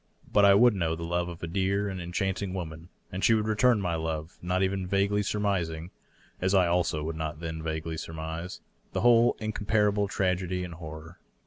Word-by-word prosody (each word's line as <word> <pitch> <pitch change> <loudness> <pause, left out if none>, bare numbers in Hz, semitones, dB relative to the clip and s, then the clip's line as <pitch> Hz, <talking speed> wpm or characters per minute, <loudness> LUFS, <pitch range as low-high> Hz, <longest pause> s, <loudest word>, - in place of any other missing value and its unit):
But 100 -1 +6
I 100 0 +7
would 120 +3 +6
know 85 -4 0
the 85 - -6
love 85 +1 -1
of 85 -1 -9
a - - -2
dear 100 +3 0
and 95 -2 -4
enchanting 95 +2 -2
woman^ 80 -2 -6 0.2
and 95 0 -4
she 115 - +5
would 110 -1 0
return 110 +2 +3
my 90 -3 -1
love, 80 0 -3
not 90 +2 0
even 95 -1 -1
vaguely 100 +2 +2
surmising 90 -5 -1 0.5
(as 95 +2 +2
I 95 -2 +5
also 85 -3 +1
would 80 +1 -3
not 80 -1 -4
then 80 -1 -5
vaguely 80 0 -3
surmise) 80 +2 -6 0.3
the - - -1
whole 120 0 +5
incomparable 105 -1 +1
tragedy 90 -1 -1
and 90 -1 -6
horror. 80 +1 -9
90 Hz, 190 wpm, -28 LUFS, 80-100 Hz, 0.5 s, I